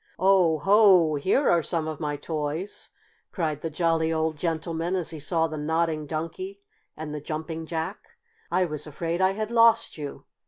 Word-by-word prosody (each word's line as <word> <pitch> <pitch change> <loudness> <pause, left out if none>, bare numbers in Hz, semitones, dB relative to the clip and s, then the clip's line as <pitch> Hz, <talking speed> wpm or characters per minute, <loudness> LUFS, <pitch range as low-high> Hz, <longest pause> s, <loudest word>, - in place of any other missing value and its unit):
"Oh, 185 -4 +4
ho! 190 -2 +5
Here 185 - +1
are 170 - +4
some 160 0 -1
of 155 -2 -5
my 150 -2 -2
toys!" 155 +5 -4 0.4
cried 155 -5 -2
the 165 - -3
jolly 165 0 +1
old 160 0 0
gentleman 165 +2 -2
as 180 -3 -2
he 160 - -7
saw 165 +3 +1
the 155 -1 -4
Nodding 160 0 -1
Donkey 375 - -5 0.3
and 155 -1 -6
the 150 - -5
Jumping 160 +2 -5
Jack. 160 -1 -4 0.5
"I 185 - +2
was 150 -2 -5
afraid 165 +4 -3
I 190 +1 +3
had 215 +2 -4
lost 230 -7 +4
you. 145 -2 -7
160 Hz, 170 wpm, -26 LUFS, 155-180 Hz, 0.5 s, ho